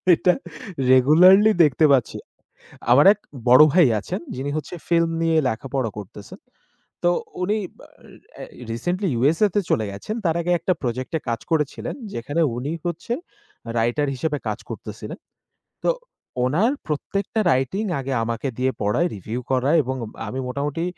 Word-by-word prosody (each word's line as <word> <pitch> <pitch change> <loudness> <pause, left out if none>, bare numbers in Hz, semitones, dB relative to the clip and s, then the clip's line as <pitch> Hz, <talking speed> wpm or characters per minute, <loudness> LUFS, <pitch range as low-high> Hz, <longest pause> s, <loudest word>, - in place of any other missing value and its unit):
এটা 180 +2 +3 0.6
রেগুলারলি 180 +11 +7
দেখতে 150 +1 +3
পাচ্ছি। 130 -5 +2 0.7
আমার 135 +4 +6
এক 210 - -20 0.3
বড় 130 +4 +9
ভাই 175 -4 +6
আছেন। 185 - -5
যিনি 135 +3 -4
হচ্ছে 155 +3 -6
ফিল্ম 165 -1 +3
নিয়ে 165 -1 +2
লেখাপড়া 130 +1 -2
করতেছেন। 100 0 -11 0.6
তো, 175 - +4 0.3
উনি 205 +4 +1 0.8
আ - - -6
এ - - -6 0.3
রিসেন্টলি 175 - -2
USA 160 - +3
তে - - +4
চলে 110 - +1
গেছেন। 100 - -6
তার 165 -1 +2
আগে 175 +1 -1
একটা 185 +3 +1
প্রজেক্টে 130 +6 -2
কাজ 115 -1 -1
করেছিলেন। 150 -3 -1 0.2
যেখানে 145 +8 -2 0.2
উনি 135 +5 -3
হচ্ছে 175 +7 -3 0.7
রাইটার 120 +6 +1
হিসেবে 145 +3 -2
কাজ - - -3
করতেছিলেন। - - -8 0.7
তো, - - +4 0.5
ওনার 175 - +2
প্রত্যেকটা 195 +8 -2
রাইটিং 135 - 0 0.2
আগে 135 0 -4
আমাকে 115 +4 -3
দিয়ে 130 +1 +1
পড়ায়। 105 +12 +1
রিভিউ 110 +6 -5
করায় 135 +5 +3
এবং 130 +1 -3 0.3
আমি 130 +5 -4
মোটামুটি 145 +5 -2
145 Hz, 145 wpm, -22 LUFS, 125-170 Hz, 0.8 s, বড়